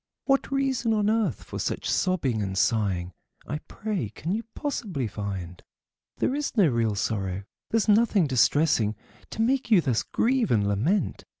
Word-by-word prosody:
What 275 Hz, -1 st, +2 dB
reason 265 Hz, -4 st, +1 dB
on 210 Hz, 0 st, +2 dB
earth 220 Hz, -, 0 dB
for -, -, -7 dB
such -, -, -2 dB
sobbing 140 Hz, -, +1 dB
and 95 Hz, -1 st, -3 dB
sighing, 95 Hz, -5 st, +1 dB, 0.3 s
I 150 Hz, -, -3 dB
pray, 205 Hz, -, -3 dB
can 155 Hz, -, -5 dB
you 215 Hz, +3 st, 0 dB
possibly 200 Hz, -, -3 dB
find? 95 Hz, -5 st, -5 dB, 0.6 s
There -, -, +1 dB
is 285 Hz, -3 st, -3 dB
no 195 Hz, -5 st, +6 dB
real 115 Hz, -4 st, +1 dB
sorrow, 100 Hz, -2 st, -2 dB, 0.3 s
there's 225 Hz, -1 st, +1 dB
nothing 210 Hz, -3 st, +4 dB
distressing, 130 Hz, -4 st, +3 dB, 0.3 s
To 225 Hz, -, -1 dB
make 260 Hz, +1 st, +1 dB
you 215 Hz, -5 st, +6 dB
thus 130 Hz, -9 st, +1 dB
grieve 250 Hz, -1 st, +1 dB
and 105 Hz, -3 st, +2 dB
lament. 125 Hz, -, 0 dB
155 Hz, 160 wpm, -26 LUFS, -, 0.6 s, no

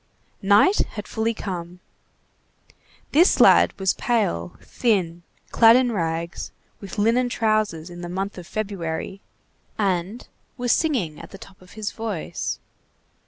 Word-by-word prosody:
Night 205 Hz, -, +4 dB
had 210 Hz, -1 st, -6 dB
fully 225 Hz, 0 st, -1 dB
come. 180 Hz, -3 st, -6 dB, 1.3 s
This 340 Hz, +5 st, +4 dB
lad -, -, +5 dB
was 190 Hz, -1 st, +2 dB
pale, 85 Hz, -, -1 dB
thin, 185 Hz, -8 st, -1 dB, 0.3 s
clad 230 Hz, 0 st, +7 dB
in 250 Hz, -1 st, +3 dB
rags, 170 Hz, -3 st, -3 dB, 0.3 s
with 200 Hz, +2 st, -9 dB
linen 230 Hz, +4 st, +2 dB
trousers 215 Hz, -8 st, 0 dB
in 175 Hz, 0 st, -9 dB
the 175 Hz, -, -6 dB
month 190 Hz, +2 st, -4 dB
of 175 Hz, -, -11 dB
February, 195 Hz, -3 st, -4 dB, 0.6 s
and 195 Hz, +2 st, -1 dB, 0.3 s
was 245 Hz, -1 st, 0 dB
singing 235 Hz, -, 0 dB
at -, -, -10 dB
the 195 Hz, -, -11 dB
top 195 Hz, 0 st, -15 dB
of 180 Hz, +1 st, -17 dB
his 215 Hz, -1 st, -4 dB
voice. 220 Hz, -7 st, -4 dB
200 Hz, 130 wpm, -23 LUFS, 175-225 Hz, 1.3 s, clad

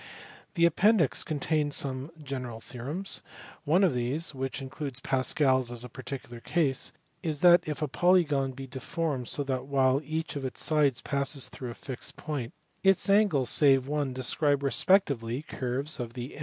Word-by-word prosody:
The 170 Hz, -1 st, +4 dB
appendix 175 Hz, -, +3 dB
contains 150 Hz, 0 st, -1 dB
some 135 Hz, +1 st, -2 dB
general 130 Hz, -5 st, -5 dB
theorems. 135 Hz, -, -4 dB, 0.4 s
One 170 Hz, +6 st, +4 dB
of 185 Hz, -, +4 dB
these 130 Hz, +8 st, -2 dB
(which 135 Hz, +1 st, -4 dB
includes 135 Hz, 0 st, -6 dB
Pascal 135 Hz, 0 st, +2 dB
s 125 Hz, -2 st, -3 dB
as 120 Hz, -1 st, -5 dB
a 125 Hz, -, -7 dB
particular 125 Hz, -1 st, -7 dB
case) 135 Hz, 0 st, 0 dB, 0.3 s
is 155 Hz, -3 st, -2 dB
that 175 Hz, -1 st, +7 dB
if 150 Hz, 0 st, -3 dB
a -, -, 0 dB
polygon 150 Hz, -4 st, +2 dB
be 135 Hz, +1 st, -7 dB
deformed 135 Hz, 0 st, -3 dB
so 145 Hz, -, -1 dB
that 130 Hz, -1 st, -3 dB
while 135 Hz, -1 st, +3 dB
each 160 Hz, +2 st, -4 dB
of 140 Hz, -, -4 dB
its 130 Hz, -, -4 dB
sides 145 Hz, -5 st, +2 dB
passes 140 Hz, -1 st, -1 dB
through 125 Hz, -, -7 dB
a 120 Hz, -, -7 dB
fixed 130 Hz, -2 st, -7 dB
point, 140 Hz, -7 st, -4 dB, 0.3 s
its 195 Hz, +1 st, +4 dB
angles 195 Hz, -, +3 dB
(save 135 Hz, -3 st, +4 dB
one) 145 Hz, -2 st, -1 dB
describe 140 Hz, +3 st, +1 dB
respectively 140 Hz, -, +2 dB
curves 135 Hz, +1 st, -3 dB
of 120 Hz, -1 st, -5 dB
the 125 Hz, +2 st, -7 dB
140 Hz, 165 wpm, -29 LUFS, 130-155 Hz, 0.4 s, that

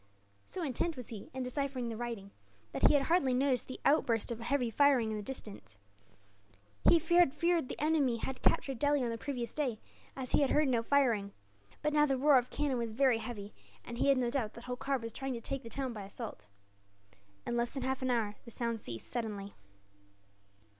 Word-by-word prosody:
So 365 Hz, -, -4 dB
intent 305 Hz, +3 st, -1 dB
was 250 Hz, -, -6 dB
he, 215 Hz, -4 st, -8 dB
in 260 Hz, 0 st, -4 dB
deciphering 255 Hz, -1 st, -2 dB
the 225 Hz, -, -4 dB
writing, 225 Hz, -4 st, -5 dB, 0.4 s
that 135 Hz, -, +4 dB
he -, -, +4 dB
had 280 Hz, -, +4 dB
hardly 275 Hz, -5 st, +2 dB
noticed 260 Hz, -1 st, +1 dB
the 255 Hz, -, -7 dB
outburst 235 Hz, -6 st, +3 dB
of 235 Hz, -, -4 dB
heavy 245 Hz, 0 st, 0 dB
firing 260 Hz, -4 st, +4 dB
in -, -, -2 dB
the -, -, -4 dB
distance. 210 Hz, -, -9 dB, 1.1 s
He -, -, +7 dB
had 345 Hz, -1 st, +4 dB
feared 340 Hz, -3 st, +1 dB
the -, -, -5 dB
enemy 295 Hz, -6 st, +2 dB
had 260 Hz, +3 st, -5 dB
captured 270 Hz, -4 st, +2 dB
Delhi 290 Hz, -2 st, +2 dB
on 235 Hz, -, -1 dB
the 230 Hz, -, -3 dB
previous 255 Hz, -3 st, -4 dB
day, 255 Hz, -8 st, -1 dB, 0.4 s
as 260 Hz, -2 st, -5 dB
he -, -, +4 dB
had 280 Hz, -, +3 dB
heard 300 Hz, -2 st, +3 dB
no 240 Hz, -3 st, +2 dB
firing; 230 Hz, -6 st, +2 dB, 0.5 s
but 300 Hz, 0 st, +1 dB
now 300 Hz, 0 st, +5 dB
the 270 Hz, -1 st, +1 dB
roar 280 Hz, 0 st, +6 dB
of 250 Hz, 0 st, -6 dB
cannon 285 Hz, -4 st, 0 dB
was 230 Hz, -2 st, -3 dB
very 255 Hz, -1 st, +3 dB
heavy, 215 Hz, -3 st, -6 dB, 0.3 s
and 235 Hz, 0 st, -7 dB
he -, -, +2 dB
had 275 Hz, -1 st, +5 dB
no 245 Hz, -2 st, +1 dB
doubt 240 Hz, -6 st, -1 dB
that 235 Hz, -, -10 dB
Holkar 250 Hz, +2 st, -1 dB
was 230 Hz, -2 st, -7 dB
trying 270 Hz, -1 st, -3 dB
to 235 Hz, -, -4 dB
take 270 Hz, +3 st, -4 dB
the 230 Hz, -, -9 dB
town 265 Hz, 0 st, -3 dB
by 210 Hz, -, -6 dB
assault. 205 Hz, -, -8 dB, 1.0 s
In -, -, -2 dB
less 240 Hz, 0 st, +1 dB
than 270 Hz, 0 st, -5 dB
half 265 Hz, 0 st, -1 dB
an 260 Hz, -, 0 dB
hour 225 Hz, -4 st, +1 dB
the -, -, -11 dB
sound 235 Hz, 0 st, -2 dB
ceased, 115 Hz, -, -6 dB
suddenly. 210 Hz, -4 st, -4 dB
250 Hz, 210 wpm, -33 LUFS, 230-275 Hz, 1.1 s, He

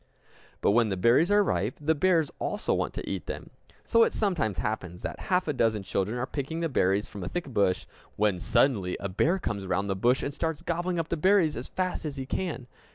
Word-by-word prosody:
But -, -, +4 dB
when 115 Hz, +1 st, +3 dB
the 95 Hz, -, -1 dB
berries 120 Hz, -, +4 dB
are 205 Hz, 0 st, +5 dB
ripe, 100 Hz, -, -1 dB
the 155 Hz, +2 st, +2 dB
bears 165 Hz, -1 st, +2 dB
also 210 Hz, -, -1 dB
want -, -, -1 dB
to -, -, -5 dB
eat -, -, -4 dB
them! -, -, -6 dB, 0.3 s
So 230 Hz, -, +4 dB
it -, -, +4 dB
sometimes 170 Hz, -, 0 dB
happens 90 Hz, -5 st, -3 dB
that -, -, -4 dB
half 180 Hz, -1 st, +2 dB
a 150 Hz, -, +1 dB
dozen 110 Hz, -5 st, +1 dB
children 100 Hz, +4 st, -1 dB
are 125 Hz, -, -1 dB
picking 145 Hz, +4 st, -4 dB
the 165 Hz, -1 st, -1 dB
berries 100 Hz, -5 st, +1 dB
from 100 Hz, -, -8 dB
a -, -, -4 dB
thick 175 Hz, -4 st, -3 dB
bush, 100 Hz, -7 st, +1 dB, 0.3 s
when 105 Hz, -3 st, +1 dB
suddenly 115 Hz, -3 st, +2 dB
a 100 Hz, -, -3 dB
bear 155 Hz, -, +2 dB
comes 100 Hz, -, -4 dB
round 100 Hz, +1 st, 0 dB
the -, -, 0 dB
bush 120 Hz, +7 st, +2 dB
and 140 Hz, -, -3 dB
starts 160 Hz, +1 st, -3 dB
gobbling 175 Hz, +1 st, -1 dB
up 165 Hz, -1 st, -2 dB
the 170 Hz, -, -1 dB
berries 185 Hz, -2 st, +3 dB
as 120 Hz, -, -6 dB
fast 185 Hz, -1 st, -2 dB
as 150 Hz, -3 st, -5 dB
he 135 Hz, -, -4 dB
can! 155 Hz, -3 st, -3 dB
135 Hz, 225 wpm, -28 LUFS, 100-170 Hz, 0.3 s, are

